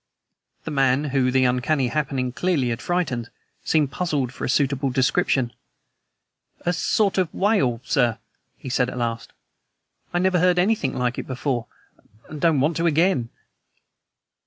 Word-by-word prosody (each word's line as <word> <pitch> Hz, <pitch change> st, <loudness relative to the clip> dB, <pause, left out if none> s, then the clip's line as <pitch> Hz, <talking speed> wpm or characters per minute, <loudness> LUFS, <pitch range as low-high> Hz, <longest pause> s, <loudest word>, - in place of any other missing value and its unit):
The -, -, -5 dB
man, 135 Hz, -1 st, +2 dB
whom 130 Hz, -2 st, +2 dB
the 130 Hz, 0 st, +3 dB
uncanny 125 Hz, +2 st, +1 dB
happening 135 Hz, -2 st, -1 dB
clearly 145 Hz, -3 st, 0 dB
had 115 Hz, -, -3 dB
frightened, 140 Hz, -10 st, -2 dB, 0.3 s
seemed 150 Hz, -4 st, +1 dB
puzzled 145 Hz, -8 st, -1 dB
for -, -, -8 dB
a -, -, -1 dB
suitable 140 Hz, 0 st, +1 dB
description. 130 Hz, -1 st, +1 dB, 1.1 s
"A 175 Hz, -, 0 dB
sort 200 Hz, +2 st, +1 dB
of 180 Hz, -4 st, 0 dB
wail, 190 Hz, -, +1 dB
sir," 120 Hz, -4 st, +1 dB, 0.4 s
he -, -, -10 dB
said 125 Hz, 0 st, +1 dB
at 125 Hz, -, -7 dB
last. 115 Hz, -1 st, -3 dB, 0.8 s
"I 175 Hz, -, -1 dB
never 185 Hz, 0 st, +2 dB
heard 180 Hz, +1 st, +3 dB
anything 180 Hz, -7 st, +1 dB
like 125 Hz, 0 st, -1 dB
it -, -, -6 dB
before, 130 Hz, -2 st, -2 dB, 0.6 s
and 150 Hz, -1 st, -8 dB
don't 165 Hz, -4 st, +3 dB
want 155 Hz, +4 st, +1 dB
to 170 Hz, +1 st, +1 dB
again." 160 Hz, -6 st, +2 dB
135 Hz, 150 wpm, -23 LUFS, 125-170 Hz, 1.1 s, the